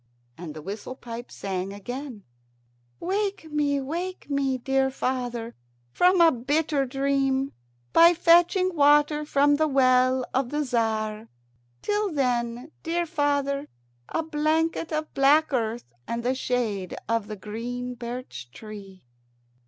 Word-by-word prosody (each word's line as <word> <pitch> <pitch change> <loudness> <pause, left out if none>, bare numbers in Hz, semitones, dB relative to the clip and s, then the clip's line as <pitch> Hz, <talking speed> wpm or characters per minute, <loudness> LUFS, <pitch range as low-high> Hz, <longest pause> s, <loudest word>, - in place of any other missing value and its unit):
And 165 -3 -8
the 155 - -8
whistle 205 +7 -6
pipe 240 -1 -8
sang 190 -1 -4
again: 245 +2 -7 0.8
"Wake 390 -3 -2
me, 290 -1 +1
wake 335 +4 -5
me, 275 -2 +1
dear 270 +1 +1
father, 245 -3 -3 0.4
from 360 - +4
a 330 -1 +7
bitter 285 +2 0
dream, 270 0 0 0.4
by 340 +1 +7
fetching 350 +2 +4
water 295 +1 +4
from 290 0 +3
the 310 +1 +2
well 255 -2 +3
of 260 -1 0
the 295 +2 -1
Tzar. 220 -3 -1 0.6
Till 415 -1 0
then, 245 -1 -1
dear 340 +1 -1
father, 285 -3 0 0.4
a 325 - -1
blanket 320 +1 0
of 310 0 -3
black 290 +2 +4
earth 225 - -2
and 235 0 -3
the 250 +2 +1
shade 230 -8 -2
of 230 -2 0
the 215 - -5
green 240 +5 -5
birch 240 - -7
tree." 195 - -11
270 Hz, 130 wpm, -26 LUFS, 235-300 Hz, 0.8 s, a